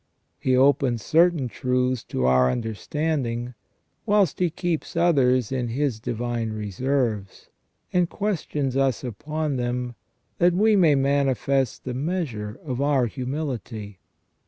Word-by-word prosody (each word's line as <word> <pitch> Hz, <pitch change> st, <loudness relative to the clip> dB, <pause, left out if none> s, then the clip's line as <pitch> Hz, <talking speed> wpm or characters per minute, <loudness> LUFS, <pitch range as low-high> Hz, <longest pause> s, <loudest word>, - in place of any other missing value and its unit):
He 130 Hz, -1 st, +2 dB
opens 130 Hz, -4 st, +3 dB
certain 165 Hz, -4 st, +3 dB
truths 125 Hz, +1 st, 0 dB
to 65 Hz, -, -2 dB
our 65 Hz, 0 st, +4 dB
understanding, 120 Hz, -, -2 dB, 0.5 s
whilst 205 Hz, -6 st, +3 dB
He 180 Hz, -1 st, +2 dB
keeps 170 Hz, 0 st, -3 dB
others 130 Hz, -9 st, +3 dB
in 125 Hz, -2 st, -1 dB
His 125 Hz, -1 st, -1 dB
divine 115 Hz, -1 st, -3 dB
reserves, 110 Hz, 0 st, -2 dB, 0.4 s
and 180 Hz, -1 st, +2 dB
questions 150 Hz, -9 st, -2 dB
us 135 Hz, -1 st, +1 dB
upon 150 Hz, +5 st, -3 dB
them, 125 Hz, 0 st, -2 dB, 0.5 s
that 175 Hz, 0 st, +4 dB
we 215 Hz, +4 st, +4 dB
may 165 Hz, -7 st, +5 dB
manifest 135 Hz, -2 st, +1 dB
the 125 Hz, -, -4 dB
measure 130 Hz, -, -3 dB
of 130 Hz, -2 st, -3 dB
our 140 Hz, -3 st, +3 dB
humility. 120 Hz, -, -5 dB
130 Hz, 120 wpm, -24 LUFS, 120-150 Hz, 0.5 s, may